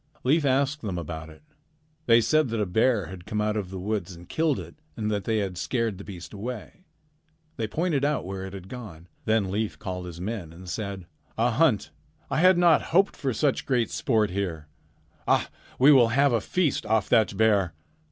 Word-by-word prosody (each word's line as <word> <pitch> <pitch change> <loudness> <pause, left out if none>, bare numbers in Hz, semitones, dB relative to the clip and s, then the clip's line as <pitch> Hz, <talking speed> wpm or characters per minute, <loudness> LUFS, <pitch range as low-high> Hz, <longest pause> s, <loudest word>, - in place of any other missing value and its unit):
"Leif 145 +4 +3
asked 140 +2 +1
them 95 -5 -3
about 80 -1 -6
it. 80 - -16 0.6
They 115 0 +6
said 155 +3 +2
that 115 -1 -2
a 105 - +1
bear 110 +2 +2
had 90 0 -10
come 105 - -2
out 105 0 0
of 100 -4 -3
the 95 - -6
woods 95 -2 -3
and 85 +1 -13
killed 155 - +1
it, - - -8 0.2
and 110 -1 -1
that 100 -2 -2
they 110 -1 +1
had 95 -4 -2
scared 115 -3 -1
the - - -7
beast 90 -2 -9
away. 120 - -7 0.7
They 110 - -1
pointed 155 +2 0
out 150 -6 0
where 95 0 -5
it 95 0 -7
had 95 -2 -8
gone. 95 -8 -9 0.2
Then 110 -4 +1
Leif 105 +1 -2
called 90 -1 -5
his 85 -1 -8
men 95 -4 -4
and 90 +2 -12
said: 100 -1 -4 0.3
"'A 120 +2 +2
hunt! 120 -3 +2 0.4
I - - +1
had 185 +1 +6
not 170 -3 +5
hoped 195 +4 +3
for 135 - -2
such 140 +3 0
great 125 -4 +1
sport 110 -6 +1
here. 90 -6 -3 0.6
Ah, - - +2 0.3
we 135 +4 +7
will 130 -5 +7
have 135 +3 +3
a 115 - +2
feast 175 - 0
off 110 -2 +2
that 110 -4 +3
bear!' 100 -6 +3
110 Hz, 200 wpm, -26 LUFS, 95-130 Hz, 0.7 s, we